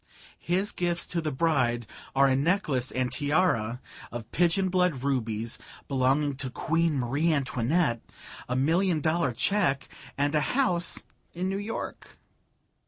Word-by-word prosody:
His 190 +4 0
gifts 175 -1 -1
to 170 - -1
the 155 -1 -2
bride 130 -6 +1 0.3
are 135 +1 +5
a 130 - +3
necklace 140 -4 +1
and 125 -1 -1
tiara 145 -7 +1 0.3
of 115 -1 -7
pigeon 180 +3 +2
blood 180 -8 +1
rubies 115 -4 -1 0.3
belonging 135 +1 +1
to 135 -1 -1
Queen 165 +4 0
Marie 135 +7 +1
Antoinette, 135 -2 +1 0.5
a 125 - 0
million 165 +6 +2
dollar 160 -2 +1
cheque 140 - +1 0.3
and 145 +1 +1
a 150 - +3 0.2
house 180 -10 +2 0.3
in 185 +2 -1
New 195 +1 -2
York. 215 +2 -6
145 Hz, 135 wpm, -28 LUFS, 130-175 Hz, 0.5 s, are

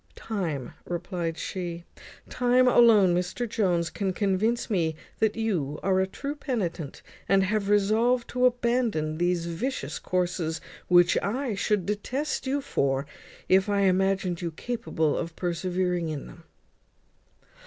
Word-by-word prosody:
"Time," 170 - -4
replied 175 -1 -3
she; 170 -1 -4 0.4
"time 250 +1 +3
alone, 220 -7 +6
Mr 185 +7 -1
Jones, 175 -7 0
can 190 +3 -2
convince 205 +4 0
me 165 -6 0 0.2
that 220 -1 +2
you 175 -11 -1
are 190 0 +2
a 190 - +2
true 280 +9 -5
penitent, 190 - -4 0.3
and 195 0 +5
have 200 +1 0
resolved 225 +4 +3
to 250 0 +3
abandon 235 -11 0
these 175 -1 +1
vicious 230 +11 -3
courses, 175 -3 -1 0.3
which 175 -1 +5
I 240 +4 -1
should 200 -1 0
detest 255 +9 -2
you 280 +2 0
for, 135 - 0 0.4
if 190 +2 +4
I 200 -1 +2
imagined 190 -2 +1
you 170 - -2
capable 160 -4 -2
of 165 -1 -4
persevering 180 -1 -1
in 150 -3 -4
them." 170 -1 -14
190 Hz, 130 wpm, -27 LUFS, 170-225 Hz, 0.4 s, alone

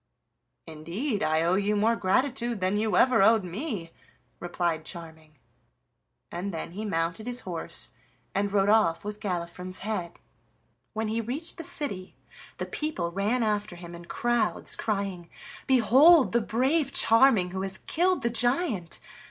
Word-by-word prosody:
"Indeed, 180 - -4
I 160 -2 +2
owe 170 +2 +2
you 205 +2 +1
more 220 +3 +2
gratitude 240 +3 0
than 185 +2 0
you 215 +1 +1
ever 250 -5 +5
owed 220 +1 +5
me," 185 - -5 0.5
replied 170 -2 -2
Charming. 160 -2 -9 0.9
And 185 +3 -4
then 165 -1 -6
he 210 +5 -6
mounted 170 +3 -2
his 245 0 -3
horse 175 -3 -1 0.4
and 200 0 0
rode 195 -1 +2
off 205 -5 +3
with 210 0 -5
Galifron's 180 -2 -4
head. 180 -6 -4 0.7
When 220 0 -2
he 225 +2 -1
reached 275 +9 -5
the - - -4
city 200 - -3 0.4
the - - -3
people 300 - -3
ran 210 +7 0
after 210 -2 -1
him 175 0 -10
in 170 0 -10
crowds, 240 +3 0
crying: 195 -5 -3 0.4
"Behold 265 - +6
the 235 - +2
brave 270 +7 +1
Charming, 225 -8 +4
who 190 +1 -4
has 190 0 -1
killed 360 0 0
the 235 - +1
giant!" 240 - 0
205 Hz, 145 wpm, -27 LUFS, 175-240 Hz, 0.9 s, Behold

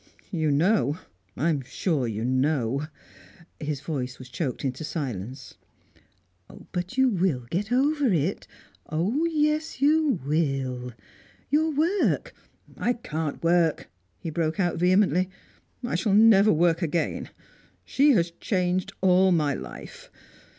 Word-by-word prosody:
"You 160 -5 0
know 155 +1 +2 0.4
I 155 +6 +1
am 145 -3 -1
sure 135 +1 -1
you 110 0 -3
know 130 +1 0 0.3
" 170 - -24
His 145 -3 -2
voice 130 -5 -4
was 130 -1 -11
choked 135 +1 -3
into 130 +3 -3
silence. 130 - -5 1.1
"But 180 +7 -4
you 265 0 +5
will 175 - 0
get 205 +6 -2
over 285 +3 +2
it 170 +2 -1 0.4
oh, 200 - 0
yes, 305 -2 0
you 295 - +3
will! 135 -5 -1 0.6
Your 315 +2 +3
work 325 +7 +1 0.2
" - - -25
"I - - +4
can't 160 -11 -4
work!" 165 - +2 0.3
he 165 - -6
broke 160 +3 -1
out 175 -3 +1
vehemently 185 0 +3 0.6
"I 245 - -3
shall 205 -4 +1
never 215 -1 +6
work 165 +2 +2
again. 170 0 -1 0.6
She 285 +2 +3
has 170 -5 +2
changed 180 -2 -1
all 185 0 +4
my 150 -5 +2
life. 65 - -9
170 Hz, 130 wpm, -26 LUFS, 140-210 Hz, 1.1 s, never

